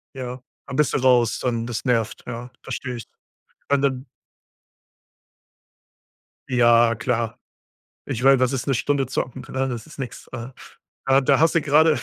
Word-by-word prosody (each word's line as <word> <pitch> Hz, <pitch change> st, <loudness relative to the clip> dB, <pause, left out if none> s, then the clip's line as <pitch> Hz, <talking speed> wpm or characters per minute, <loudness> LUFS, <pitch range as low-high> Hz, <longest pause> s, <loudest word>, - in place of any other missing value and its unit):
Ja. 125 Hz, -1 st, -6 dB, 0.3 s
Dann 130 Hz, -, -5 dB
bist 150 Hz, -, +2 dB
du -, -, +2 dB
raus, 125 Hz, -3 st, +3 dB
dann 115 Hz, -2 st, -1 dB
das 120 Hz, +2 st, -4 dB
nervt, 115 Hz, -4 st, 0 dB
ja, 120 Hz, +1 st, -6 dB
verstehe 125 Hz, -2 st, -5 dB
ich. 115 Hz, -, -7 dB, 0.7 s
Ja, 140 Hz, -, +5 dB
und 140 Hz, -, -2 dB
dann 135 Hz, -1 st, 0 dB, 2.4 s
Ja, 120 Hz, -2 st, +5 dB
klar. 115 Hz, 0 st, -2 dB, 0.7 s
Ich 120 Hz, -, -4 dB
meine, 135 Hz, -1 st, +6 dB
was 130 Hz, +1 st, +2 dB
ist 130 Hz, -, -2 dB
'ne 135 Hz, -, +1 dB
Stunde 140 Hz, +3 st, +1 dB
zocken, 125 Hz, 0 st, -3 dB
ne? 135 Hz, 0 st, -1 dB
Das 120 Hz, 0 st, -5 dB
ist 150 Hz, -, -14 dB
nix. 125 Hz, -3 st, -7 dB
Äh, 115 Hz, 0 st, -6 dB, 0.6 s
da 135 Hz, 0 st, +5 dB
da 135 Hz, 0 st, +3 dB
hast 160 Hz, +1 st, +4 dB
du 165 Hz, -, +4 dB
gerade 150 Hz, 0 st, +4 dB
125 Hz, 165 wpm, -23 LUFS, 120-135 Hz, 2.4 s, meine